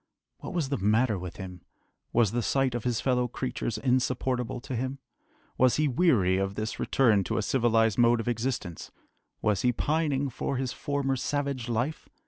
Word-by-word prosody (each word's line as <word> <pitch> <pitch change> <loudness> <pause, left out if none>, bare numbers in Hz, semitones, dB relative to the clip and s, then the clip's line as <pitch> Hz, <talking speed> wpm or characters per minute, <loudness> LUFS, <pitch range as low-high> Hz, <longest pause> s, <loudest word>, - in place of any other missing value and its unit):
What - - -7
was 155 -6 0
the 140 - -1
matter 105 +1 +2
with 90 -1 -7
him? 90 -2 -8 0.5
Was 115 -4 +3
the 120 - 0
sight 135 +1 +1
of 120 -1 -4
his 120 -3 0
fellow 125 -2 +1
creatures 120 -2 -3
insupportable 125 -1 0
to 130 - -5
him? 130 +3 -3 0.6
Was 130 -1 +5
he 150 0 +2
weary 120 - +3
of 95 0 -2
this 110 +2 -4
return 110 -7 +3
to - - -2
a 110 - 0
civilised 115 -3 +2
mode 120 0 +5
of 115 - -4
existence? 115 - -3 0.5
Was 105 -3 +2
he 125 - +3
pining 145 +1 0
for 130 +2 -3
his 130 -1 -2
former 140 -2 -1
savage 140 -2 -2
life? 120 +7 -2
125 Hz, 175 wpm, -28 LUFS, 110-135 Hz, 0.6 s, Was